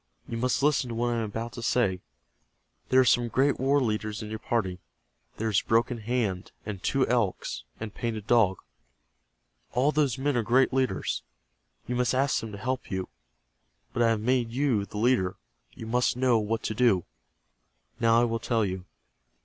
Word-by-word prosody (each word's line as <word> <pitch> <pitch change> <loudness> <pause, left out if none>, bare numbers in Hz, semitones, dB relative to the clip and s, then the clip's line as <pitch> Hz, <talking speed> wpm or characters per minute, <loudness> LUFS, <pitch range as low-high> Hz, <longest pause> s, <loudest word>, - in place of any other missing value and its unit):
You 115 - -5
must 125 +3 0
listen 145 -4 +2
to 115 - -4
what 120 +1 0
I - - -1
am 115 - -1
about 115 +3 -5
to 120 - -7
say. 110 -6 +1 0.9
There 130 - +5
are - - +3
some 120 0 +3
great 135 +5 +2
war 135 +2 +3
leaders 110 -3 -2
in 105 - -7
your 110 - -4
party. 95 -7 -1 0.6
There 110 - -1
is 105 -4 +2
Broken 115 +1 +1
Hand, 110 -5 -2
and 100 -3 -5
Two 135 +4 +2
Elks, 110 - -1
and 110 -2 -6
Painted 110 -3 -4
Dog. 110 -5 +3 1.2
All 130 +5 +3
those 145 -5 +1
men 140 +1 0
are 120 - +2
great 125 +4 +3
leaders. 130 -1 0 0.6
You 125 - -3
must 125 +1 +1
ask 135 +1 +2
them 115 - -6
to 100 - -7
help 130 +4 -3
you. 95 -1 -3 0.8
But 120 - -1
I 115 - +5
have 110 -2 +1
made 125 0 +1
you 120 -5 0
the 105 - -8
leader. 105 -5 +2 0.4
You 115 - -9
must 125 +2 +1
know 125 -3 +3
what 110 +1 -2
to - - -2
do. 110 -6 +3 0.9
Now 115 0 +4
I - - +4
will 115 -1 -1
tell 115 -1 +1
you. 95 -1 -4
115 Hz, 185 wpm, -27 LUFS, 105-125 Hz, 1.2 s, There